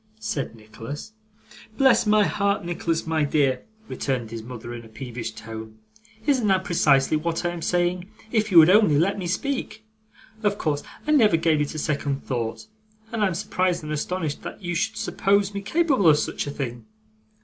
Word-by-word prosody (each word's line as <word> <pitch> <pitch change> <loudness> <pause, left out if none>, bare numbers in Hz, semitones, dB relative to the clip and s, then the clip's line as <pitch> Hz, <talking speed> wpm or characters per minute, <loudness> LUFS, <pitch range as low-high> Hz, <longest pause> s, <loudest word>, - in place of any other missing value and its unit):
said 150 - -3
Nicholas. 115 - -9 0.6
'Bless 265 -4 +4
my 210 0 +5
heart, 200 -2 0
Nicholas 170 -1 -2
my 160 -1 +1
dear,' 140 -3 +1 0.3
returned 125 -5 -3
his 115 -1 -5
mother 120 0 -8
in 120 -1 -8
a - - -13
peevish 120 0 -6
tone, 110 0 -9 0.5
'isn't 260 -7 +2
that 190 -1 +3
precisely 150 -5 +3
what 165 +2 -2
I - - +2
am 175 -1 -6
saying, 180 +2 0 0.2
if 215 -2 +1
you 175 - +5
would 165 +2 +9
only 200 -8 +5
let 195 +6 +1
me 180 - -3
speak? 220 +1 -3 0.6
Of 205 -2 +1
course, 150 -5 -1 0.2
I 305 - 0
never 220 - +5
gave 160 -2 +2
it 150 +1 -2
a - - -3
second 145 -2 -2
thought, 120 - -3 0.5
and 225 -2 -1
I - - +4
am 185 - -2
surprised 180 -2 -1
and 150 - -5
astonished 155 0 -2
that - - -8
you 175 0 -2
should 215 +5 -1
suppose 200 -2 +1
me 200 - -3
capable 270 - +2
of 150 - +6
such - - -2
a - - -2
thing. 120 -5 -5
165 Hz, 185 wpm, -24 LUFS, 135-200 Hz, 0.6 s, would